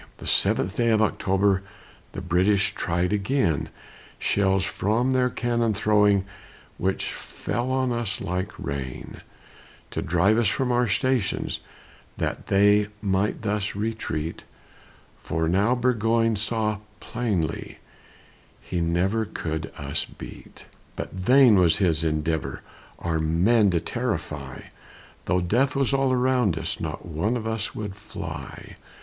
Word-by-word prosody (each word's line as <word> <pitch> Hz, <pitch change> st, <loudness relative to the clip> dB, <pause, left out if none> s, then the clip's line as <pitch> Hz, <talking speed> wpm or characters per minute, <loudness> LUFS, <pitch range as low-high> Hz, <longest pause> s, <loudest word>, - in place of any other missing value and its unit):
The -, -, -10 dB
seventh 95 Hz, +2 st, +2 dB
day 120 Hz, -1 st, +3 dB
of 110 Hz, -1 st, +4 dB
October 100 Hz, -2 st, +2 dB, 0.5 s
The -, -, -5 dB
British 95 Hz, +3 st, +2 dB
tried 90 Hz, +3 st, 0 dB
again, 105 Hz, -, +1 dB, 0.5 s
Shells 95 Hz, -1 st, +1 dB
from 120 Hz, +6 st, 0 dB
their 125 Hz, -1 st, +3 dB
cannon 120 Hz, -3 st, 0 dB
throwing, 105 Hz, -2 st, +3 dB, 0.5 s
Which 95 Hz, +1 st, -1 dB
fell 120 Hz, +2 st, -4 dB
on 130 Hz, -1 st, +1 dB
us 115 Hz, -4 st, -1 dB
like 90 Hz, 0 st, -2 dB
rain; 65 Hz, -2 st, -6 dB, 0.7 s
To -, -, -2 dB
drive 90 Hz, +7 st, +3 dB
us 115 Hz, -, +3 dB
from 125 Hz, +5 st, 0 dB
our 120 Hz, 0 st, +2 dB
stations, 125 Hz, 0 st, 0 dB, 0.6 s
That -, -, -3 dB
they 105 Hz, +1 st, +4 dB
might 100 Hz, +1 st, 0 dB
thus 105 Hz, -1 st, -1 dB
retreat; 100 Hz, -7 st, -3 dB, 0.8 s
For 80 Hz, 0 st, -1 dB
now 100 Hz, +8 st, +3 dB
Burgoyne 115 Hz, -2 st, +2 dB
saw 110 Hz, 0 st, 0 dB, 0.2 s
plainly 100 Hz, -10 st, -2 dB, 0.8 s
He 90 Hz, -, -3 dB
never 90 Hz, +7 st, +1 dB
could 80 Hz, -6 st, -4 dB
us -, -, -2 dB
beat. -, -, -12 dB, 0.3 s
But -, -, -5 dB
vain 120 Hz, +4 st, +5 dB
was 90 Hz, -3 st, +4 dB
his 85 Hz, -5 st, +2 dB
endeavor 80 Hz, 0 st, -1 dB, 0.3 s
Our 80 Hz, -1 st, -1 dB
men 95 Hz, +8 st, +3 dB
to 85 Hz, -2 st, +2 dB
terrify; 80 Hz, -, -4 dB, 0.6 s
Though 90 Hz, -1 st, +1 dB
death 125 Hz, +10 st, +1 dB
was 135 Hz, 0 st, +1 dB
all 135 Hz, -1 st, +2 dB
around 125 Hz, -8 st, +2 dB
us, -, -, -2 dB
Not -, -, -4 dB
one 90 Hz, +9 st, -1 dB
of 110 Hz, -, -6 dB
us 110 Hz, -2 st, -3 dB
would 105 Hz, -3 st, -5 dB
fly. 95 Hz, -8 st, -8 dB
100 Hz, 130 wpm, -25 LUFS, 90-115 Hz, 0.8 s, vain